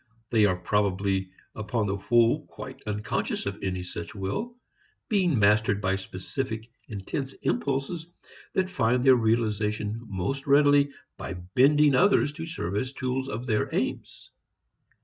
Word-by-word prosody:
They 110 -2 +5
are 95 -2 0
probably 95 -1 0 0.2
upon 110 +1 -2
the 100 0 -1
whole 115 +3 +2
quite - - -9
unconscious 105 +1 -2
of - - -4
any 90 -1 -2
such 85 +1 -7
will, 105 - -3 0.5
being 185 - +2
mastered 105 0 +3
by 95 -1 +1
specific 110 +5 -5 0.2
intense 130 +6 -4
impulses 140 +5 -1 0.5
that 190 0 +1
find 125 -4 +2
their 130 -1 +7
realization 110 -2 0
most 110 +9 -3
readily 145 0 +5 0.3
by 95 - -5
bending 135 +11 +4
others 180 -2 +4
to 165 +1 -6
serve 100 - -3
as 130 +5 -2
tools 130 0 -2
of 115 +2 -4
their 110 -4 0
aims. - - -3
115 Hz, 135 wpm, -27 LUFS, 100-135 Hz, 0.5 s, their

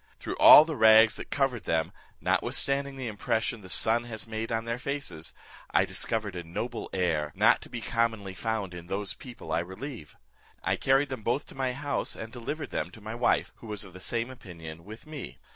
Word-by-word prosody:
Through - - -5
all 150 - +11
the 160 -1 -3
rags 110 -1 +7
that - - -7
covered 135 -5 0
them, 80 0 0 0.3
notwithstanding 140 0 +1
the 130 -1 -5
impression 115 +1 -1
the 95 - -12
sun 115 +5 +1
has 110 -2 -5
made 110 0 -4
on 115 0 -1
their 115 +1 -2
faces, 140 - -4 0.4
I - - +3
discovered 110 -4 -2
a 90 - -4
noble 115 +8 -4
air, 80 -5 0
not - - +5
to - - -11
be 120 - -5
commonly 110 -4 -1
found 105 -2 -2
in 85 -1 -9
those 100 +2 -2
people 125 -2 -10
I - - +2
relieve. 95 - -7 0.5
I - - +2
carried 135 +1 +2
them 130 -4 -5
both 120 +6 0
to - - -11
my 130 -1 -1
house, 145 +2 -2
and 110 +2 -8
delivered 145 +5 -5
them 75 - -2
to 110 - -14
my 110 +1 -6
wife, 120 +1 +2
who 115 - -12
was 105 -2 -3
of 95 - -13
the 95 - -10
same 115 +5 -2
opinion 85 -9 -10
with 110 +6 -10
me. 150 -3 -7
115 Hz, 205 wpm, -29 LUFS, 95-125 Hz, 0.5 s, all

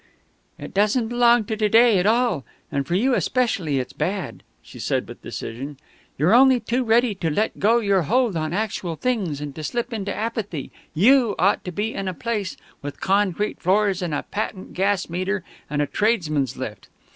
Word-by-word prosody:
"It - - -9
doesn't 215 +4 +2
belong 240 -1 +4
to 220 - -2
to 215 -1 +1
day 225 -2 +6
at 180 - +1
all, 230 - +2 0.3
and 140 -1 -2
for 175 - 0
you 250 +7 +2
especially 200 - 0
it's 130 -1 -3
bad," 190 0 -3 0.2
she - - -13
said - - -1
with - - -11
decision. 135 +5 -6 0.4
"You're 160 +9 +3
only 260 +1 +6
too 240 +3 -1
ready 235 0 +3
to 180 -4 -2
let 210 +8 -1
go 225 +4 +4
your 200 -5 +2
hold 235 - +1
on 155 -1 -2
actual 190 -4 -2
things 190 - -1
and 145 -1 -5
to 155 - -7
slip 240 - -3
into 200 -3 -3
apathy; 210 - -4 0.2
you 235 - +4
ought 195 +4 +2
to 180 - -4
be 210 +5 -2
in 195 - -4
a 185 - -3
place 215 -3 -3 0.2
with 145 0 -7
concrete 200 +1 0
floors 195 +1 +2
and 170 -4 -2
a - - -2
patent 205 -2 -5
gas 195 0 +1
meter 185 +3 -2 0.3
and 145 0 0
a - - 0
tradesmen's 155 - 0
lift. 115 -5 -6
200 Hz, 190 wpm, -23 LUFS, 165-230 Hz, 0.4 s, day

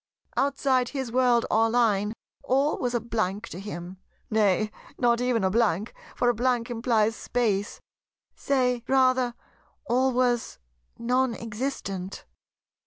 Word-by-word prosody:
Outside 270 -2 +1
his 265 -3 -4
World, 245 -1 +3
or 225 +1 +4
Line, 215 -3 +2 0.3
all 280 +2 +1
was 245 -2 -1
a - - +2
blank 215 -2 -2
to 175 - -7
him; 185 -2 -7 0.3
nay, 215 0 +2 0.3
not 240 -1 +2
even 245 -4 +1
a 190 - +2
blank, 215 -2 +1 0.2
for 245 - +1
a 240 - +4
blank 245 0 0
implies 225 -2 +1
Space; 215 -5 -1 0.6
say, 250 -3 +1
rather, 255 -2 +3 0.5
all 260 +1 +2
was 245 -1 0 0.4
non 250 +1 +1
existent. 210 -5 -5
235 Hz, 125 wpm, -26 LUFS, 215-255 Hz, 0.6 s, or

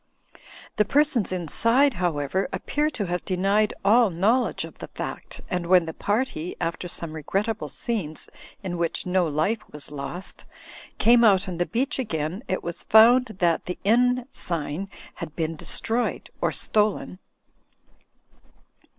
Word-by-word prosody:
The 210 - +5
per 290 +8 +4
sons 250 -11 0
inside, 230 - +3
however, 175 - -1
appear 295 +1 -1
to 220 -9 -4
have 180 0 -3
denied 195 +3 +1
all 225 +2 +5
know 200 +9 +2
ledge - - -4
of - - -14
the - - -7
fact, - - -7
and 180 -1 -3
when 180 -1 +5
the 160 - -6
party 205 -6 -2
(after 170 +2 -3
some 170 -2 -5
re 160 - -6
grettable 210 +8 -2
scenes 195 -11 -4 0.4
in 175 -2 -4
which 170 -1 -1
no 180 -1 +1
life 155 +9 0
was 150 -1 -8
lost) 145 +6 -7 0.5
came 235 +2 +5
out 200 -3 +4
on 175 -2 -5
the 175 - 0
beach 265 +4 -1
again, 170 - -3
it 185 - -2
was 170 -1 -4
foimd 225 0 +5
that 170 -3 +1
the 180 - -4
inn 245 +4 +3
sign 170 +3 -3 0.2
had 155 - -8
been 165 -1 -2
destroyed 230 +9 +2
or - - +1
stolen. 210 -3 +1
190 Hz, 150 wpm, -24 LUFS, 170-230 Hz, 0.5 s, The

